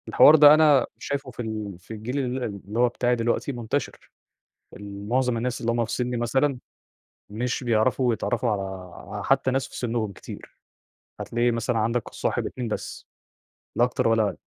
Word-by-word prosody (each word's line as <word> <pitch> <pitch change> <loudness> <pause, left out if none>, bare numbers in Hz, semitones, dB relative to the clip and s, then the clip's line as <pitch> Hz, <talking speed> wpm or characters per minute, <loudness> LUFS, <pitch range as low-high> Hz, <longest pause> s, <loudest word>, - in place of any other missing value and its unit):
الحوار 155 - +7
ده 150 -1 +9
أنا 150 -4 +5
شايفُه 140 -2 -4
في 125 - -7
ال 110 -5 -5
في 90 - -16
الجيل 115 +6 -4
ال 130 -1 -2
اللي 105 0 -5
هو 125 0 +4
بتاعي 120 +1 0
دلوقتي 120 +4 -1
منتشر، 120 +2 -4 0.6
ال 100 0 -9
معظم 125 -1 +1
الناس 125 +2 -2
اللي 115 -1 0
هُم 115 0 0
في 110 - -8
سنّي 125 -1 -1
مثلًا، 130 +3 +1 0.7
مش 125 +5 -3
بيعرفوا 120 +2 +2
يتعرّفوا 120 +1 -1
على 100 -2 -1 0.6
آآ، - - -4
حتّى 135 -1 +2
ناس 135 +1 -1
في - - -10
سنّهم 115 -3 -2
كتير، 95 - -11 0.6
هتلاقي 120 +1 0
مثلًا 115 0 -1
عندك 115 +2 0
الصاحب، - - -2
2، 125 -2 -5
بس، 105 - -6 0.7
لا 120 - +5
أكتر 120 -2 0
ولا 115 -1 +3
أقل، 105 - -2
120 Hz, 175 wpm, -25 LUFS, 110-130 Hz, 0.7 s, ده